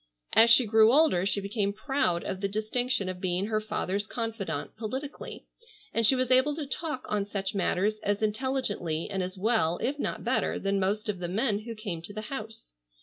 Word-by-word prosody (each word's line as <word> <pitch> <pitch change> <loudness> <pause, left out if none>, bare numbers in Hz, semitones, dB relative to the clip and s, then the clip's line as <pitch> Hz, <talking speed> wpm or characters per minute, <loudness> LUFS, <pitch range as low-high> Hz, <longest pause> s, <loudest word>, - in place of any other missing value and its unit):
As 230 +1 +7
she 235 +2 +7
grew 220 +1 +6
older 260 - +4
she 200 - +1
became 200 0 -1
proud 215 -6 0
of 190 - -4
the 200 - +1
distinction 215 +2 -1
of 185 -1 -5
being 185 0 0
her 215 0 0
father's 210 -1 -2
confidante 225 -4 -4
politically, 260 +6 -6 0.5
and 230 -2 +4
she 265 - +6
was 255 0 0
able 260 +3 +4
to 305 -2 -4
talk 280 -1 -3
on 210 -1 0
such 200 -1 -3
matters 205 +2 +1
as 205 +1 -1
intelligently 215 -8 -1
and 195 -1 -1
as 185 +1 -4
well 190 -5 +2
if 280 +4 -2
not - - -3
better - - 0
than 195 0 0
most 205 +3 0
of 205 -3 -2
the 175 - -3
men 205 +3 0
who 230 +1 -7
came 200 -7 -5
to 185 +5 -8
the 215 - -3
house. 220 - -7
215 Hz, 200 wpm, -28 LUFS, 195-240 Hz, 0.5 s, As